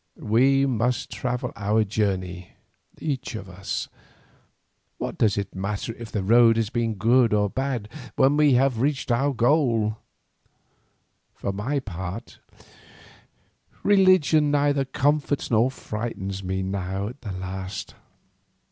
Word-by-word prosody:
We 135 +5 +3
must 125 -1 -1
travel 125 0 -3
our 105 +1 +1
journey 95 -4 -2 0.5
each 135 -6 -3
of 100 -3 -7
us; 95 +1 -4 1.1
what - - -4
does 105 -3 +2
it 100 - -3
matter 100 +4 -3
if 115 -1 -10
the 105 - -2
road 115 +3 +6
has 115 -1 0
been 115 -2 -1
good 115 +3 +3
or 105 -1 +1
bad 130 -5 -2 0.3
when 135 +1 +4
we 150 -2 +4
have 125 -2 +2
reached 140 0 0
the 130 +4 +2
goal? 120 -4 +2 1.4
For 100 - -3
my 130 +9 -2
part 95 0 -7 1.4
religion 185 -7 +4
neither 145 -1 +2
comforts 145 +1 0
nor 115 +3 +4
frightens 105 -6 -5
me 95 +1 -2
now 95 +1 -3
at 125 +4 -12
the 100 -4 -5
last. 95 +1 -6
115 Hz, 125 wpm, -24 LUFS, 100-135 Hz, 1.4 s, road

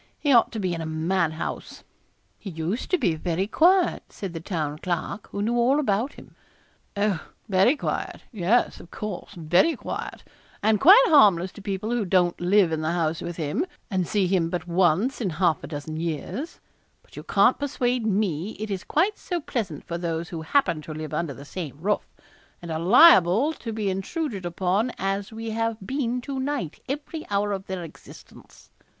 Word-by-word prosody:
He 290 -2 +2
ought 235 - +5
to 225 - -3
be 185 -3 -1
in 165 - -4
a - - -4
madhouse.' 160 0 -2 0.6
'He 200 - -7
used 170 +7 -3
to 365 - +3
be 215 - +1
very 170 +3 -1
quiet,' 350 - +3
said 195 -4 -7
the 165 - -4
Town 155 -4 -3
Clerk, 180 +4 -3
who 200 - -3
knew 235 +3 0
all 250 +4 +3
about 235 0 0
him. - - -15 0.6
'Oh! 200 -5 0 0.2
very 195 +8 +4
quiet - - -4
yes, 215 +2 +1
of 175 - -13
course, 210 -2 -6
very 175 - +3
quiet, - - -6 0.4
and 215 0 +3
quite 395 - +9
harmless 190 - +5
to 205 - -12
people 200 +2 -3
who 240 -2 +1
don't 180 -2 +1
live 185 -1 +4
in 160 -1 -1
the 160 +2 -1
house 165 -2 -1
with 175 - -5
him, 160 - -1 0.3
and 185 -3 0
see 205 -3 +1
him 180 -3 +1
but 175 -2 -3
once 180 +8 +2
in 200 - 0
half 170 -2 +1
a - - -6
dozen 155 +1 -6
years; 170 - -4 0.4
but - - -20
you - - -6
can't - - +3
persuade 255 -4 0
me 200 -3 0
it 215 -1 -4
is 190 -2 -3
quite 380 +7 +1
so 350 -2 -3
pleasant 215 - -4
for 170 -1 -4
those 165 -1 -3
who 165 -2 -5
happen 170 - +1
to 155 0 -8
live 155 -1 -6
under 160 -5 -2
the 140 - -11
same 150 -3 -6
roof, 205 +5 -1 0.5
and 170 -1 -8
are 160 - -2
liable 215 - +6
to 230 -6 -7
be 215 -2 -2
intruded 195 - -3
upon 190 +7 0
as 195 +1 -2
we 225 0 -5
have 225 0 -1
been 250 0 -1
to 270 +1 -5
night 265 - -3
every 295 +3 -4
hour 205 0 0
of 195 -1 -4
their 185 -2 -4
existence.' 165 - -14
195 Hz, 190 wpm, -25 LUFS, 170-235 Hz, 0.6 s, quite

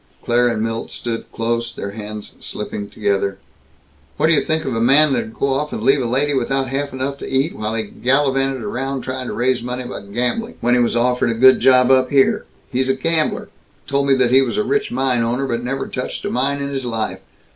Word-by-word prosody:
Claire 120 +1 +3
and 115 -2 0
Milt 115 0 -3
stood 115 -1 -5
close, 115 +1 -2
their 100 -3 -6
hands 105 0 -8
slipping 100 0 -5
together. 100 -2 -1 0.8
"What 160 - +3
d' - - +5
you 150 - +4
think 160 -1 -1
of 130 -4 -2
a 115 - 0
man 140 +4 +5
that'd 230 +5 -2
go 140 - 0
off 150 +2 -2
and - - -4
leave 135 0 +4
a - - -1
lady 140 +5 +1
without 135 0 0
half 140 +2 -2
enough 135 +2 -3
to - - -6
eat, 135 +5 0
while 110 +1 -3
he 110 - -1
gallivanted 135 +2 0
around, 130 +5 -3
trying 130 -1 -4
to - - -4
raise 125 0 +1
money 125 +1 -4
by 125 -3 -6
gambling, 125 - -2
when 120 +1 +2
he 125 - +4
was 120 0 +1
offered 125 0 +2
a 115 - 0
good 130 +3 +6
job 130 -1 +5
up 130 -1 +4
here? 135 -2 +3 0.3
He's 130 +1 0
a 135 - +3
gambler 160 +3 0 0.4
told 140 0 0
me 135 -1 +4
he 130 +2 +5
was 130 -3 -1
a 210 - +2
rich 420 - 0
mine 130 -3 +1
owner, 120 +4 0
but 120 -2 -2
never 135 +2 -3
touched 125 - -5
a - - -2
mine 140 +3 0
in 140 - -3
his 135 -1 -3
life. 110 -5 -2
130 Hz, 225 wpm, -19 LUFS, 115-135 Hz, 0.8 s, good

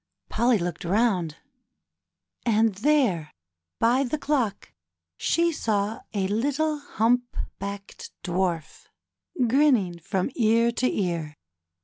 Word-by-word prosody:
Polly 235 +1 +3
looked 175 -3 -4
round, 180 -4 +1 1.1
and 225 -2 +3
there, 210 - +2 0.5
by 245 +4 +3
the 275 +3 -2
clock, 270 -9 -1 0.4
she 335 - +1
saw 215 -6 -1
a 195 -3 -1
little 290 +8 0
humpbacked 225 -6 -2
Dwarf 175 -3 -2 0.6
grinning 235 - +3
from 190 - -2
ear 230 0 +3
to 255 +2 0
ear. 170 -5 -2
220 Hz, 95 wpm, -25 LUFS, 185-250 Hz, 1.1 s, Polly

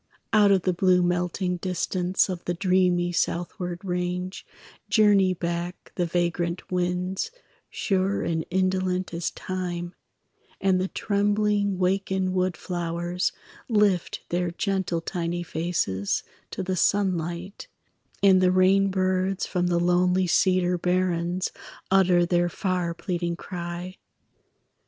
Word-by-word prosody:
Out 210 -2 +6
of 190 -3 +3
the 185 - +1
blue 180 0 +3
melting 180 +1 0
distance 180 0 0
Of 180 -3 -5
the 175 - -1
dreamy 180 -1 +2
southward 175 +1 -2
range 180 +1 -3 0.4
Journey 200 -4 +4
back 170 +1 -4
the 175 -2 -1
vagrant 175 0 -1
winds, 180 - -1 0.4
Sure 195 0 0
and 160 -1 -1
indolent 185 0 0
as 170 0 -1
time; 175 -2 -4 0.7
And 190 -1 +2
the 185 - 0
trembling 205 -1 +1
wakened 190 0 0
wood 185 -1 0
flowers 175 0 -2 0.4
Lift 205 -5 +2
their 175 0 0
gentle 185 -1 -1
tiny 175 0 -3
faces 160 - -1 0.3
To - - -4
the 185 0 -1
sunlight; 185 - -1 0.6
and 190 -2 +6
the 180 -1 +4
rainbirds 185 0 +2
From 180 -1 -1
the 175 -1 +2
lonely 180 +1 +3
cedar 180 0 +2
barrens 180 0 0 0.4
Utter 185 -2 +4
their 175 0 +2
far 180 -2 -2
pleading 175 -1 -2
cry. 175 +1 -6
180 Hz, 115 wpm, -25 LUFS, 175-190 Hz, 0.7 s, Out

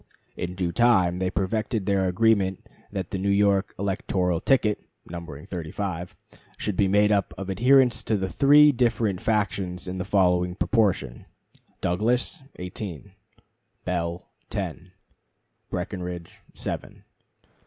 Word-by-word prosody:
In 90 +1 -4
due 90 -2 -1
time 95 -5 +3
they 95 0 0
perfected 105 +2 -1
their 95 -2 +2
agreement 95 0 +2 0.3
that 95 -2 -4
the 95 - -2
New 100 +1 0
York 100 -1 +2
electoral 95 -3 0
ticket 110 -2 +2 0.2
(numbering 85 -3 -8
thirty 90 -5 -6
five) 90 -2 -4 0.4
should 105 - -2
be 100 +1 +3
made 105 +2 +4
up 100 -2 +1
of 95 0 -4
adherents 125 +4 +4
of 110 -3 +2
the 95 - -1
three 145 +8 +6
different 115 -6 0
factions 95 -4 -1
in 95 +1 -4
the - - -1
following 90 -2 +2
proportion: 95 - 0 0.5
Douglas, 120 - 0
eighteen; 90 0 -7 0.7
Bell, 85 -1 -2 0.2
ten; 90 - -4 0.8
Breckinridge, 90 -2 -5 0.2
seven. - - -5
95 Hz, 125 wpm, -25 LUFS, 90-105 Hz, 0.8 s, three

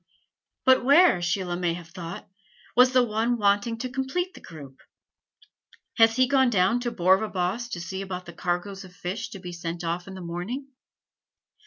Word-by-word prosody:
But 260 -1 +5
where, 285 - +5
Sheila 175 0 -1
may 175 -1 -1
have 170 -1 -10
thought, 170 -2 -8 0.5
was 250 +1 +6
the 255 -1 +4
one 230 +1 0
wanting 205 +2 +1
to 255 +2 -5
complete 270 +9 -2
the - - -13
group? 140 -5 -12 1.2
Has 225 0 +6
he 255 0 +4
gone 265 -1 +4
down 215 +2 +2
to 240 -1 -3
Borvabost 190 +4 +1
to 175 - -3
see 190 +3 -5
about 185 -2 -6
the 175 - -10
cargoes 180 +3 -3
of 180 -1 -14
fish 205 +6 -5
to 200 - -8
be 180 -1 -7
sent 170 0 -5
off 170 +2 -3
in 190 - -8
the 185 - -8
morning? 180 +11 -5
195 Hz, 175 wpm, -26 LUFS, 175-240 Hz, 1.2 s, was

